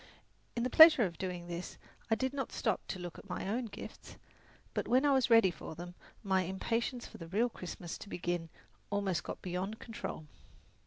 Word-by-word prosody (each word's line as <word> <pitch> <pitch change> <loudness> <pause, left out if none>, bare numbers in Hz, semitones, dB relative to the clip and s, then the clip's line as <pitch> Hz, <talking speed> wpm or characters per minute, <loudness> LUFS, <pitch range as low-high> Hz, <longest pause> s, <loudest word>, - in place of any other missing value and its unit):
In 235 - 0
the 250 - -1
pleasure 315 -6 +10
of 170 -5 -3
doing 180 -2 -3
this, 175 +1 -6 0.3
I 225 - +4
did 260 +4 -1
not 275 -1 -3
stop - - 0
to - - -3
look 175 -2 -7
at 200 - -15
my 180 - -3
own 235 +5 -1
gifts; 220 - -9 0.6
but - - -1
when 255 +4 +4
I 285 - +5
was 265 -2 +3
ready 225 -5 +7
for 160 - -8
them, 175 +2 -7 0.3
my 190 -2 +2
impatience 230 +7 -2
for - - -11
the 165 - -7
real 220 +8 +2
Christmas 180 -4 -7
to - - -9
begin 175 -2 -2 0.4
almost 200 -4 0
got - - -6
beyond 185 +4 -3
control. 220 -9 -6
195 Hz, 195 wpm, -33 LUFS, 175-235 Hz, 0.6 s, pleasure